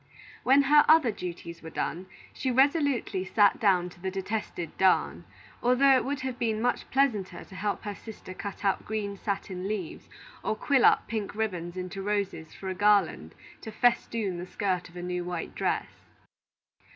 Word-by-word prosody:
When 275 +2 +5
her 295 +2 +6
other 310 -7 +6
duties 170 -3 -7
were 160 - -8
done, 180 +3 -3 0.3
she 265 - -2
resolutely 270 - +2
sat 205 +1 +3
down 190 -6 +3
to 175 - -17
the 190 - -2
detested 190 -3 -4
darn, 190 -1 +2 0.4
although 260 +3 +5
it 255 - +2
would 280 +2 -3
have 260 -2 -4
been 220 -2 0
much 245 +2 -1
pleasanter 245 -8 0
to 190 - -14
help 205 +2 -2
her 205 - -4
sister 205 -3 -10
cut 200 +1 -7
out 195 - +1
green 210 -2 -3
satin 195 -2 -4
leaves 200 -6 -5 0.3
and 215 - -1
quill 275 -4 +3
up - - +4
pink 215 -3 -4
ribbon 180 -6 -2
into 185 +2 -5
roses 195 -5 -2
for 195 - -9
a 190 - -1
garland 195 - +2 0.3
to 220 - -7
festoon 225 -5 +1
the 180 - -6
skirt 180 -2 -2
of 175 - -19
a 175 - -5
new 180 0 -2
white 175 -1 -5
dress. - - -2
205 Hz, 175 wpm, -28 LUFS, 185-235 Hz, 0.4 s, her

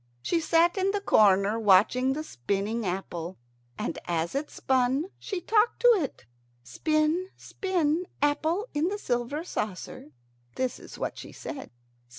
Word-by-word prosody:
She 340 - +1
sat 335 +3 +3
in 380 +1 +2
the 410 +1 0
corner 205 - +4
watching 225 +6 +4
the 305 +2 -4
spinning 200 - -2
apple. 180 -1 -4 0.4
And - - -3
as 170 -1 -1
it 285 +2 -2
spun 265 +7 +1
she 390 - -4
talked 430 +5 +2
to 485 - +6
it. 300 - -3 0.4
"Spin, 310 - 0
spin, 355 -2 -1
apple 315 +8 +1
in 300 +3 +1
the 405 +2 -2
silver 250 - -2
saucer." 200 - -5 0.5
This 255 -1 -2
is - - -11
what - - -4
she - - -9
said. 275 -4 -7
290 Hz, 145 wpm, -27 LUFS, 210-345 Hz, 0.5 s, to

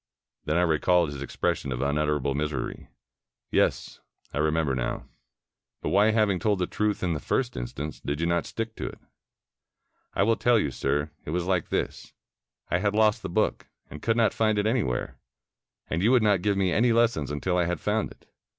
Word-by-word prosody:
Then 75 +2 +1
I 90 - +4
recalled 85 0 +3
his 70 - -7
expression 70 -1 -2
of 60 - -2
unutterable 70 0 0
misery. 75 -1 -3 0.6
"Yes, - - +1 0.3
I - - -2
remember 80 -2 +1
now. 60 -2 -2 0.8
But - - -1
why, 100 +3 +4
having 105 -4 +2
told 105 -3 +1
the 90 - 0
truth 105 +2 -1
in 90 -2 +1
the 75 - -2
first - - -1
instance, 70 +5 -5
did 70 +1 -2
you 85 - 0
not 85 0 0
stick 115 0 -4
to - - -3
it?" - - -8 1.2
"I 100 - +3
will 115 +2 +2
tell 120 -1 +4
you, 75 -10 0
sir. 75 +3 -1
It - - -8
was 85 +2 -1
like 90 -3 0
this. - - -3 0.6
I 90 - +2
had 100 +1 0
lost 110 -1 +3
the - - -5
book, - - 0 0.2
and 75 - -8
could 115 0 +1
not 115 -2 +3
find 110 -1 +1
it 105 - +1
anywhere, 110 - -1 0.7
and 85 - -1
you 105 - +4
would 125 -3 +5
not 100 -4 +3
give 100 0 +1
me 95 -2 +2
any 120 +5 +3
lessons 115 - +2
until 75 +5 -1
I 90 - +2
had 90 0 -2
found 105 +1 0
it. - - -17
90 Hz, 195 wpm, -27 LUFS, 75-105 Hz, 1.2 s, would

